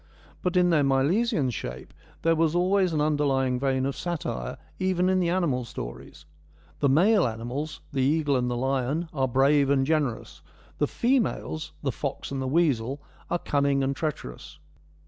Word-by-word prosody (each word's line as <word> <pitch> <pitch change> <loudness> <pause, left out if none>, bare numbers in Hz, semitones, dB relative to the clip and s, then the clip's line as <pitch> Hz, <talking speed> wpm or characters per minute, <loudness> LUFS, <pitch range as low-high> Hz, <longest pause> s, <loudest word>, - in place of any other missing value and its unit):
But 180 0 0
in 180 -1 +4
their 155 -3 +4
Milesian 140 - +2
shape 65 - -7 0.3
there 165 0 +4
was 165 0 +1
always 185 +1 +2
an 155 - 0
underlying 135 -4 +1
vein 130 -1 0
of 140 0 -2
satire, 105 - -4 0.2
even 185 -1 +1
in 185 0 +3
the 175 -2 +1
animal 170 -9 +1
stories. 70 - -8 0.5
The 140 - +3
male 185 - +4
animals, 120 +7 -5
the 135 - 0
eagle 145 +1 +2
and 125 -1 0
the 120 - -2
lion, 135 +5 -1
are 135 -3 +1
brave 135 +2 +3
and 135 -1 +3
generous; 130 - -1 0.4
the 145 - +2
females, 235 - -1
the 135 - 0
fox 140 +3 -5
and 135 -1 -2
the 130 - -2
weasel, 140 -4 +1 0.3
are 175 - +1
cunning 140 -4 +1
and 135 +1 0
treacherous. 135 - -5
140 Hz, 165 wpm, -26 LUFS, 130-165 Hz, 0.5 s, in